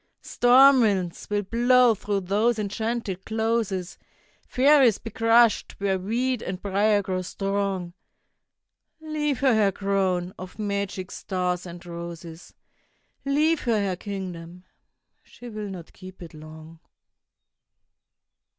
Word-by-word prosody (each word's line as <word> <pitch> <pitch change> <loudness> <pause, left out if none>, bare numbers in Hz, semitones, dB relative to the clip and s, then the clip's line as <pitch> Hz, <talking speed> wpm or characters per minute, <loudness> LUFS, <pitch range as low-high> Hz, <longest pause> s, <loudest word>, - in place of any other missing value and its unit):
Storm 260 +2 +5
winds 190 -6 -1
will 205 0 0
blow 240 +3 +4
through 205 -1 -2
those 210 +5 +1
enchanted 215 -2 -3
closes, 220 -5 -2 0.5
Fairies 265 -4 +4
be 225 - -9
crushed 230 0 +3
where 195 -1 -1
weed 240 +5 -1
and 185 0 -5
briar 205 +1 +1
grow 185 -1 -2
strong... 195 -1 -3 1.1
Leave 300 -4 -2
her 265 -3 +4
her 210 -3 +3
crown 190 -2 -1
of 185 0 -9
magic 200 -3 -3
stars 180 -1 -3
and 175 0 -10
roses, 170 -1 -9 0.7
Leave 300 +3 +2
her 230 -4 +1
her 195 -2 -1
kingdom—she 185 +4 -10
will 215 -2 -6
not 180 -4 -9
keep 185 -1 -12
it 165 - -11
long! 155 +1 -12
200 Hz, 115 wpm, -25 LUFS, 185-230 Hz, 1.1 s, Storm